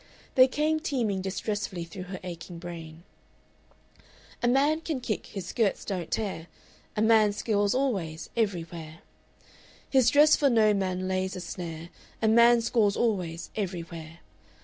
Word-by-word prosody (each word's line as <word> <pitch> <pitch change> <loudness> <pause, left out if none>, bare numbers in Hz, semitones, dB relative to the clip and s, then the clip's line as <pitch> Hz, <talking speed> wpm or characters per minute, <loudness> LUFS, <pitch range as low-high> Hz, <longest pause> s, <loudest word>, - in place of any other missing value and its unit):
They 255 0 +7
came 305 +4 0
teeming 235 - -1
distressfully 195 -1 -3
through 185 +2 -8
her 185 -1 -5
aching 175 -1 -7
brain: 165 -1 -9 1.4
"A 240 - +2
man 285 +5 +3
can 315 -5 -3
kick, 235 -4 -3
his 195 -4 -6
skirts 210 +1 0
don't 180 -5 -3
tear; 190 -6 -3 0.5
A 215 - +2
man 220 -2 +5
scores 205 0 0
always, 190 -12 -2
everywhere. 170 -7 -3 0.9
"His 260 -3 +4
dress 295 +4 +6
for 285 - +3
no 220 -3 +4
man 185 -2 -1
lays 185 0 -1
a - - -5
snare; 170 -2 -6 0.3
A 220 - +1
man 235 +1 +6
scores 225 -3 +2
always, 180 -8 -1
everywhere. 170 -4 -5
200 Hz, 140 wpm, -28 LUFS, 175-235 Hz, 1.4 s, They